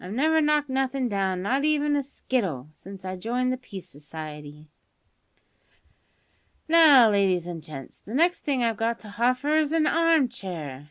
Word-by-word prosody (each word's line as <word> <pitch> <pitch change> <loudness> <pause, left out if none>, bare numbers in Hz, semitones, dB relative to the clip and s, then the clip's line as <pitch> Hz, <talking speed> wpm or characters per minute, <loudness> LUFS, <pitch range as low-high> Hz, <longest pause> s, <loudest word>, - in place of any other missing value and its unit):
I've 185 +3 -7
never 315 +6 +2
knocked 300 -1 +2
nothin' 265 -1 -1
down, 190 -3 -1
not 265 +7 0
even 295 -1 +1
a 285 - +1
skittle, 195 - -3
since 190 +3 -12
I 185 0 -4
joined 245 +6 -1
the - - -3
Peace 195 -8 -10
Society. 150 -1 -10 2.0
"Now, 300 -8 +7
ladies 190 -4 +1
an' 170 -2 -6
gents, 145 -4 -10
the 220 - -8
next 340 +4 +2
thing 270 -4 -1
I've 230 -2 0
got 230 +1 -1
to 215 - -11
hoffer 250 +7 0
is 310 -2 +1
a 325 -1 +2
harm 330 -4 +3
chair. 165 - -7
235 Hz, 165 wpm, -25 LUFS, 180-285 Hz, 2.0 s, Now